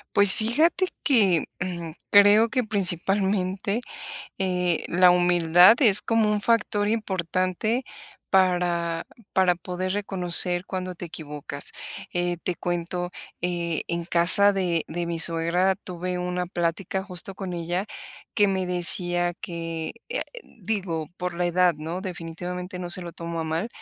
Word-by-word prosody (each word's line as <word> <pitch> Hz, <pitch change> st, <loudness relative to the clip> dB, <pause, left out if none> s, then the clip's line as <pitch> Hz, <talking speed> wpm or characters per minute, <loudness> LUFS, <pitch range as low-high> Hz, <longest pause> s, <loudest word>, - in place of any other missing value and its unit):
Pues 200 Hz, -2 st, +9 dB
fíjate 310 Hz, -, +1 dB, 0.2 s
que, 200 Hz, -, +3 dB, 0.2 s
mm, 170 Hz, -2 st, -5 dB, 0.2 s
creo 205 Hz, +3 st, +6 dB
que 255 Hz, -1 st, -1 dB
principalmente, 195 Hz, +1 st, -1 dB, 0.6 s
eh, 180 Hz, -3 st, -1 dB
la 180 Hz, +1 st, +4 dB
humildad 175 Hz, +2 st, +5 dB
es 210 Hz, -6 st, +5 dB
como 225 Hz, -2 st, +1 dB
un 210 Hz, -1 st, -1 dB
factor 210 Hz, -2 st, 0 dB
importante 190 Hz, +2 st, -2 dB, 0.5 s
para 175 Hz, -3 st, 0 dB, 0.3 s
para 185 Hz, -2 st, +3 dB
poder 180 Hz, +2 st, -5 dB
reconocer 180 Hz, -3 st, +5 dB
cuando 185 Hz, -2 st, -5 dB
te 175 Hz, -, -10 dB
equivocas, 150 Hz, -3 st, -6 dB, 0.4 s
eh, 175 Hz, 0 st, -1 dB
te 180 Hz, -, -2 dB
cuento, 175 Hz, +1 st, -4 dB, 0.3 s
eh, 170 Hz, -2 st, -2 dB
en 170 Hz, 0 st, -3 dB
casa 185 Hz, +4 st, +5 dB
de 175 Hz, -4 st, -1 dB
de 170 Hz, +2 st, -4 dB
mi 170 Hz, -1 st, -4 dB
suegra 170 Hz, +3 st, +2 dB
tuve 180 Hz, -1 st, -6 dB
una 180 Hz, 0 st, -3 dB
plática 175 Hz, +2 st, -3 dB
justo 190 Hz, 0 st, -3 dB
con 190 Hz, -2 st, -6 dB
ella, 175 Hz, +3 st, -3 dB, 0.5 s
que 205 Hz, -, +3 dB
me 190 Hz, -1 st, -1 dB
decía 175 Hz, 0 st, +2 dB
que, 165 Hz, -2 st, -6 dB
eh, -, -, -3 dB, 0.2 s
digo, 185 Hz, -, -5 dB
por 180 Hz, -1 st, -4 dB
la 175 Hz, +1 st, -2 dB
edad, 175 Hz, 0 st, +2 dB
¿no? 160 Hz, +4 st, -6 dB
Definitivamente 180 Hz, 0 st, -7 dB
no 175 Hz, -1 st, -6 dB
se 185 Hz, +1 st, -1 dB
lo 170 Hz, -1 st, -8 dB
tomo 170 Hz, 0 st, -6 dB
a -, -, -3 dB
mal, 160 Hz, +6 st, -3 dB
180 Hz, 140 wpm, -24 LUFS, 170-195 Hz, 0.6 s, Pues